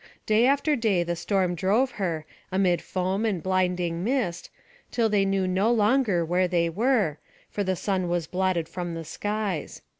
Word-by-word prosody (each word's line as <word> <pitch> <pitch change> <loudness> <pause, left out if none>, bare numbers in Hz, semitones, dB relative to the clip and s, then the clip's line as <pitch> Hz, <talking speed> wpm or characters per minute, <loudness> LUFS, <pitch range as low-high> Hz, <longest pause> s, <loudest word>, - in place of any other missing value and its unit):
Day 220 +3 +4
after 285 +2 +2
day 215 -8 +1
the 175 0 -2
storm 185 +1 0
drove 205 +10 +1
her, 170 -8 -3 0.3
amid 185 -2 +2
foam 190 +3 -2
and 200 -7 -1
blinding 180 -2 0
mist, 215 -8 -1 0.4
till 230 -2 +1
they 205 -2 +2
knew 195 -1 +1
no 190 +5 +2
longer 215 -5 +2
where 180 +2 +1
they 170 -2 +1
were, 210 - +1 0.3
for 205 - -1
the 190 -1 0
sun 185 -1 -1
was 175 -2 0
blotted 180 -1 0
from 175 -1 -5
the 165 -1 -6
skies. 205 -1 -3
185 Hz, 170 wpm, -26 LUFS, 175-215 Hz, 0.4 s, Day